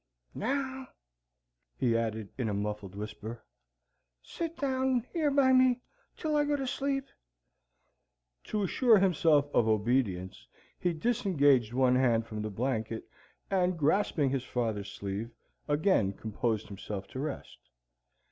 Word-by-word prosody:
Now," 265 Hz, +2 st, -2 dB, 0.9 s
he 120 Hz, -2 st, +2 dB
added 110 Hz, -3 st, -2 dB
in 120 Hz, -4 st, -2 dB
a 100 Hz, -, -1 dB
muffled 100 Hz, -1 st, -4 dB
whisper, 110 Hz, +2 st, -7 dB, 0.8 s
"sit 335 Hz, -1 st, -5 dB
down 260 Hz, -3 st, 0 dB
yer 320 Hz, -4 st, +2 dB
by 275 Hz, -2 st, +4 dB
me 255 Hz, -1 st, +4 dB, 0.4 s
till 310 Hz, -2 st, -1 dB
I 295 Hz, -, +4 dB
go 290 Hz, 0 st, +1 dB
asleep." 275 Hz, 0 st, -1 dB, 1.4 s
To 210 Hz, -1 st, -1 dB
assure 230 Hz, +3 st, +4 dB
himself 160 Hz, -6 st, +3 dB
of 115 Hz, -, +3 dB
obedience, 105 Hz, -4 st, 0 dB, 0.3 s
he 175 Hz, -, +1 dB
disengaged 155 Hz, -, +2 dB
one 130 Hz, 0 st, +3 dB
hand 115 Hz, -3 st, +3 dB
from 110 Hz, -2 st, -5 dB
the 110 Hz, -, -3 dB
blanket 110 Hz, 0 st, -2 dB, 0.5 s
and, 180 Hz, -2 st, +2 dB
grasping 150 Hz, -3 st, +2 dB
his 135 Hz, -2 st, -1 dB
father's 110 Hz, -5 st, -2 dB
sleeve, 100 Hz, +3 st, -4 dB, 0.4 s
again 145 Hz, -, +2 dB
composed 110 Hz, +1 st, -2 dB
himself 100 Hz, 0 st, -6 dB
to 130 Hz, -, -6 dB
rest. 145 Hz, 0 st, -5 dB
135 Hz, 125 wpm, -30 LUFS, -, 1.4 s, by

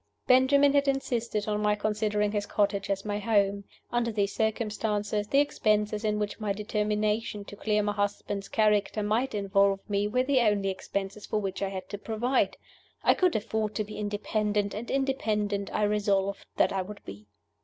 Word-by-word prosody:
Benjamin 275 Hz, +2 st, +5 dB
had 280 Hz, 0 st, +3 dB
insisted 235 Hz, -6 st, -1 dB
on 210 Hz, 0 st, 0 dB
my 210 Hz, 0 st, +2 dB
considering 210 Hz, 0 st, 0 dB
his 205 Hz, -1 st, -2 dB
cottage 200 Hz, -1 st, 0 dB
as 195 Hz, 0 st, -1 dB
my 205 Hz, 0 st, -2 dB
home. 200 Hz, -2 st, +1 dB, 0.3 s
Under 240 Hz, -1 st, 0 dB
these 200 Hz, -2 st, 0 dB
circumstances, 210 Hz, -1 st, -1 dB
the 275 Hz, -, +1 dB
expenses 215 Hz, -6 st, +1 dB
in 210 Hz, -1 st, +1 dB
which 210 Hz, +1 st, -3 dB
my 210 Hz, -2 st, -1 dB
determination 210 Hz, 0 st, -1 dB
to 205 Hz, -, -10 dB
clear 210 Hz, 0 st, 0 dB
my 205 Hz, -, 0 dB
husband's 205 Hz, -1 st, -2 dB
character 210 Hz, -1 st, +2 dB
might 220 Hz, +4 st, 0 dB
involve 195 Hz, -1 st, +2 dB
me 205 Hz, 0 st, 0 dB
were 250 Hz, +4 st, +1 dB
the 265 Hz, 0 st, +2 dB
only 205 Hz, -4 st, +2 dB
expenses 195 Hz, +1 st, -4 dB
for -, -, -1 dB
which 195 Hz, -2 st, -4 dB
I 195 Hz, -, 0 dB
had 190 Hz, -1 st, -6 dB
to 205 Hz, -, -5 dB
provide. 235 Hz, +5 st, 0 dB, 0.5 s
I -, -, +6 dB
could 365 Hz, -2 st, +2 dB
afford 215 Hz, -1 st, -1 dB
to 215 Hz, -, 0 dB
be 210 Hz, +1 st, -8 dB
independent, 210 Hz, 0 st, -1 dB
and 225 Hz, +3 st, -6 dB
independent 210 Hz, -7 st, -1 dB
I -, -, 0 dB
resolved 200 Hz, -1 st, 0 dB
that -, -, +3 dB
I 190 Hz, -, 0 dB
would 200 Hz, +2 st, -9 dB
be. 100 Hz, +2 st, -10 dB
210 Hz, 175 wpm, -28 LUFS, 205-220 Hz, 0.5 s, I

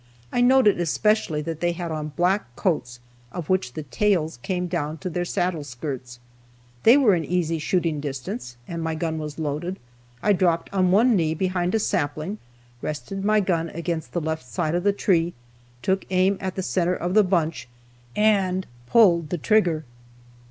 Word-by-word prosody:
I 245 Hz, -, +2 dB
noted 245 Hz, -6 st, +5 dB
especially 175 Hz, -2 st, +1 dB
that 165 Hz, 0 st, -4 dB
they 175 Hz, 0 st, +1 dB
had 170 Hz, -1 st, -5 dB
on 155 Hz, -1 st, -3 dB
black 180 Hz, -8 st, 0 dB
coats, 125 Hz, -10 st, -1 dB, 0.3 s
of 175 Hz, -4 st, -6 dB
which 180 Hz, -10 st, +1 dB
the 155 Hz, -, -5 dB
tails 160 Hz, -1 st, 0 dB
came 180 Hz, +2 st, -2 dB
down 160 Hz, -3 st, -2 dB
to 185 Hz, +2 st, -5 dB
their 175 Hz, +2 st, -1 dB
saddle 175 Hz, -3 st, -1 dB
skirts. 125 Hz, -2 st, -6 dB, 0.6 s
They 235 Hz, +5 st, +7 dB
were 250 Hz, -8 st, +5 dB
in 170 Hz, -2 st, +1 dB
easy 165 Hz, -1 st, 0 dB
shooting 165 Hz, -1 st, 0 dB
distance, 125 Hz, -3 st, -5 dB
and 170 Hz, -1 st, -4 dB
my 160 Hz, 0 st, -2 dB
gun 160 Hz, 0 st, -2 dB
was 150 Hz, -1 st, -6 dB
loaded. 160 Hz, +4 st, -3 dB, 0.5 s
I 210 Hz, -, +4 dB
dropped 175 Hz, -2 st, +1 dB
on 185 Hz, -2 st, +3 dB
one 225 Hz, +6 st, +5 dB
knee 160 Hz, -4 st, +1 dB
behind 180 Hz, +1 st, 0 dB
a -, -, +3 dB
sapling, 155 Hz, +2 st, -1 dB, 0.4 s
rested 195 Hz, +6 st, -4 dB
my 215 Hz, +1 st, +3 dB
gun 170 Hz, -4 st, 0 dB
against 170 Hz, 0 st, -4 dB
the 175 Hz, -, 0 dB
left 160 Hz, -4 st, -3 dB
side 155 Hz, +7 st, -1 dB
of 175 Hz, 0 st, 0 dB
the 205 Hz, -, +4 dB
tree, 175 Hz, -4 st, +1 dB, 0.5 s
took 190 Hz, +5 st, +1 dB
aim 185 Hz, +1 st, +3 dB
at 190 Hz, -1 st, -3 dB
the 190 Hz, -, -2 dB
center 180 Hz, -1 st, +1 dB
of 180 Hz, +1 st, -2 dB
the 215 Hz, 0 st, +6 dB
bunch, 160 Hz, -8 st, 0 dB, 0.5 s
and 195 Hz, -3 st, +2 dB, 0.2 s
pulled 170 Hz, -, +5 dB
the 175 Hz, -, -1 dB
trigger. 175 Hz, -3 st, +2 dB
175 Hz, 175 wpm, -24 LUFS, 155-190 Hz, 0.6 s, They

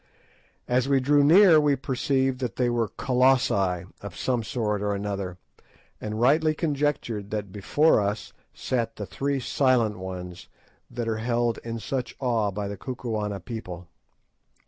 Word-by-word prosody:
As 125 Hz, +2 st, +1 dB
we 135 Hz, -1 st, +4 dB
drew 145 Hz, +2 st, +3 dB
near 170 Hz, +2 st, +7 dB
we 145 Hz, -1 st, +3 dB
perceived 130 Hz, 0 st, 0 dB
that 125 Hz, -6 st, -3 dB
they 125 Hz, -1 st, +1 dB
were 120 Hz, -2 st, 0 dB
Colossi 115 Hz, -7 st, +2 dB, 0.2 s
of 100 Hz, -4 st, -8 dB
some 125 Hz, -2 st, 0 dB
sort 105 Hz, -2 st, -2 dB
or 105 Hz, 0 st, 0 dB
another, 100 Hz, -3 st, -4 dB, 0.6 s
and 110 Hz, 0 st, -4 dB
rightly 155 Hz, +5 st, +3 dB
conjectured 145 Hz, -, -1 dB
that 105 Hz, -3 st, -4 dB
before 110 Hz, +8 st, +3 dB
us 105 Hz, +2 st, -3 dB, 0.2 s
sat 115 Hz, -3 st, -2 dB
the 105 Hz, -, -5 dB
three 135 Hz, -, -2 dB
"Silent 125 Hz, -5 st, +1 dB
Ones" 90 Hz, -1 st, -7 dB, 0.4 s
that 120 Hz, -2 st, -4 dB
are 110 Hz, -1 st, -1 dB
held 120 Hz, 0 st, 0 dB
in 115 Hz, 0 st, -5 dB
such 125 Hz, +2 st, -4 dB
awe 115 Hz, -5 st, +1 dB
by 100 Hz, +1 st, -4 dB
the 100 Hz, 0 st, -6 dB
Kukuana 110 Hz, -6 st, -4 dB
people. 90 Hz, -7 st, -7 dB
115 Hz, 145 wpm, -26 LUFS, 105-130 Hz, 0.6 s, near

